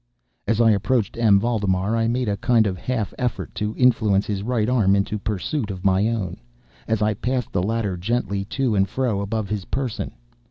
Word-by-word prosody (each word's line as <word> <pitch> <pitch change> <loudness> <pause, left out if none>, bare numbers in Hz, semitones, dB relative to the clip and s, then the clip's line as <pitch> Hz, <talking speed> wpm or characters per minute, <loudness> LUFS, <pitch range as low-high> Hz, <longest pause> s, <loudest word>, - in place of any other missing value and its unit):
As 115 +1 +1
I 115 -1 +6
approached 105 +1 +1
M. 110 -4 +4
Valdemar 100 -2 0
I 115 0 +1
made 125 +1 0
a 100 - +1
kind 115 +1 +3
of 95 -2 -1
half 110 +2 -3
effort 125 -3 -2
to 105 0 -3
influence 110 -6 +3
his 100 -2 -2
right 110 0 0
arm 110 -6 +3
into 100 +2 -1
pursuit 105 +5 -2
of 95 -1 -6
my 95 +2 +3
own, 110 -6 -2 0.5
as 110 -1 +1
I 105 0 +2
passed 125 +3 -2
the 90 - 0
latter 105 -1 -1
gently 100 0 -1
to 130 +2 -1
and 95 -1 +2
fro 120 -4 -1
above 105 +1 -2
his 105 -3 -3
person. 130 -4 -3
105 Hz, 195 wpm, -23 LUFS, 100-120 Hz, 0.5 s, I